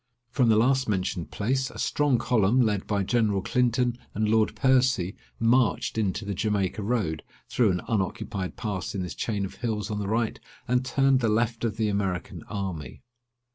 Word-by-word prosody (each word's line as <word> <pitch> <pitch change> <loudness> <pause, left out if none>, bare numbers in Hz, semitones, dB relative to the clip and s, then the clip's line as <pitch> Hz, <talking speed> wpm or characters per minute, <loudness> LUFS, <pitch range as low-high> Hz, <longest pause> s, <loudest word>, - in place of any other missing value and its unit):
From 125 -2 +3
the 110 - +5
last 130 +3 +3
mentioned 90 -3 -1
place, 130 +5 -1
a - - -12
strong 145 -4 +2
column, 115 0 +2
led 105 -5 +1
by 100 -2 0
General 105 -2 +1
Clinton 125 0 +1 0.2
and 110 +1 +1
Lord 110 0 +2
Percy, 130 -8 +2 0.2
marched 115 +2 +2
into 105 -1 -1
the 100 - -2
Jamaica 105 0 -1
Road, 100 -8 -1 0.3
through 120 -4 +2
an 90 -1 0
unoccupied 95 -2 -2
pass 100 -5 -3
in 95 - -2
this 90 - -5
chain 105 -3 -2
of 95 - -9
hills 110 -2 -2
on 105 - -2
the 100 - -3
right, 110 +2 0 0.3
and 125 +1 +2
turned 135 0 +3
the 115 -3 +1
left 115 +2 0
of 110 -3 -1
the 110 -2 +1
American 100 -4 -2
army. 95 -5 -5
110 Hz, 175 wpm, -26 LUFS, 100-125 Hz, 0.3 s, the